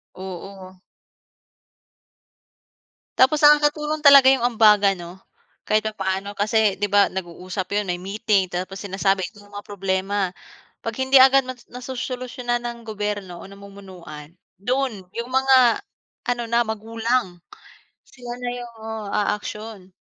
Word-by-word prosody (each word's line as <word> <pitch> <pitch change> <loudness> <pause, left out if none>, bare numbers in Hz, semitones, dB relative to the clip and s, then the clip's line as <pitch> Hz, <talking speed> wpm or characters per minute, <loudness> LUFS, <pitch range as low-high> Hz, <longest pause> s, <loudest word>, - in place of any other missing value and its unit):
Oo. 190 0 -9 2.5
Tapos 280 +4 +4
nakakatulong 300 +1 +3
talaga 280 -2 +8
’yong 265 -2 +3 0.2
ambagan 205 -3 +5
'no, 175 0 -9 0.6
kahit 215 0 +2
papaano, 195 -1 -3
kasi 210 0 +2
’di 205 - 0
ba 205 0 +4
nag-uusap 185 +1 -5
’yon, 210 - 0
may 175 0 -3
meeting. 200 -1 0
Tapos 185 +2 -5
sinasabi 195 -1 0 0.2
yung 205 0 -18
mga 205 - -6
problema. 195 -1 -2 0.5
'Pag 230 -1 -5
hindi 265 0 +6
agad 270 0 +6
ma 255 - -5 0.2
nasosolusyunan 250 -1 -4
ng 235 0 -5
gobyerno 205 -4 -4
o - - -10
namumunuan, 190 -6 -12 0.3
doon 245 -3 -2
yung 235 +2 -4
mga 260 -2 +4 0.5
ano 240 -1 -1
na, 235 +1 +3
magulang, 225 -2 -2 0.7
sila 245 -2 -9
na 245 - -2
yung 240 -1 -9
oh, 220 -2 -6
aaksiyon. 210 -1 -3
210 Hz, 125 wpm, -22 LUFS, 195-245 Hz, 2.5 s, talaga